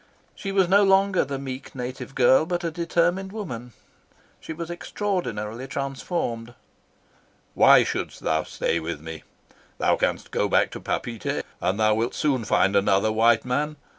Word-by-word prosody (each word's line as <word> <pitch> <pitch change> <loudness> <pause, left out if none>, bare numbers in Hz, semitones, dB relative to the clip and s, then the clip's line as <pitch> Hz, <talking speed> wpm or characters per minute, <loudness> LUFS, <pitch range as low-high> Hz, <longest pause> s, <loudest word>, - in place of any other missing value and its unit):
She 195 -1 -5
was 195 -2 +3
no 200 +3 +5
longer 195 -1 +4
the 140 0 -4
meek, 135 0 -6
soft - - -19
native 130 +1 -6
girl, 130 +4 +4
but 175 0 -2
a 165 - -1
determined 175 +3 0
woman. 125 - -6 0.7
She - - -9
was 170 +1 -5
extraordinarily 135 - -3
transformed. 130 -3 -4 1.0
"Why - - +7
shouldst - - -4
thou 80 0 +1
stay 85 - -2
with 80 -1 -5
me? 80 0 -8 0.6
Thou - - +2
canst - - -1
go - - 0
back - - +3
to - - -7
Papeete, 115 -3 -3 0.2
and 100 +3 0
thou 110 0 +4
wilt 115 +2 -1
soon 135 -6 0
find 100 -1 +2
another 100 +2 +3
white 115 +1 +3
man. 145 +5 -1
130 Hz, 160 wpm, -24 LUFS, 110-175 Hz, 1.0 s, Why